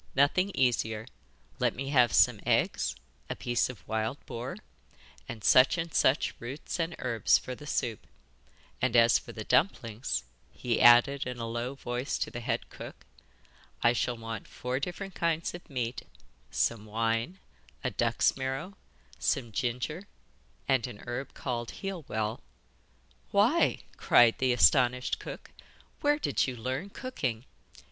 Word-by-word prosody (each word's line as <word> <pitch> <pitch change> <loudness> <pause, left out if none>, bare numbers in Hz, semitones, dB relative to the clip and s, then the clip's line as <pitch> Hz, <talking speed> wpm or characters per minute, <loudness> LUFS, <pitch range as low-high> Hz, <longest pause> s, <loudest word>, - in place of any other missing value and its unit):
'Nothing 145 +8 +3
easier. 110 -3 +1 0.5
Let - - +1
me 135 +2 -4
have 125 -5 +4
some - - +4
eggs, 60 - +1 0.3
a - - -2
piece 120 0 0
of 100 -8 -10
wild 110 +4 -1
boar, 120 +2 -5 0.7
and 110 -3 -7
such 130 +6 +6
and 165 -2 -3
such 130 +2 +3
roots 130 +8 -6
and 165 0 -1
herbs 115 -3 +3
for 130 - -6
the 150 +4 -10
soup; 120 -8 -2 0.7
and 130 -2 +1
as 115 0 +6
for - - -11
the 110 - -6
dumplings,' 120 - 0 0.3
he 120 -2 -2
added 125 +3 +6
in 125 -1 -4
a 115 - -4
low 120 +3 -3
voice 125 0 -3
to - - -3
the 120 - -5
head 120 - -2
cook, - - -10 0.8
'I 120 - +5
shall 120 0 -1
want 115 -2 -6
four 125 +1 -3
different 180 +5 -5
kinds 165 -1 -1
of 175 - -10
meat, 125 -3 -3 0.5
some 110 -2 0
wine, 115 - -1 0.5
a - - -1
duck's - - +2
marrow, 135 +8 -4 0.4
some 125 -6 0
ginger, 125 - -3 0.6
and 130 -2 +2
a 125 - -7
herb 125 +3 -5
called 120 -3 -3
heal 195 -6 -6
well.' 110 +1 -2 0.9
'Why,' 235 +12 +3 0.2
cried 120 -2 +5
the 130 -1 +2
astonished 125 0 +4
cook, - - -9 0.5
'where 295 0 +3
did 295 - 0
you 130 - -4
learn 130 - -3
cooking? 135 - -4
125 Hz, 145 wpm, -29 LUFS, 115-145 Hz, 0.9 s, such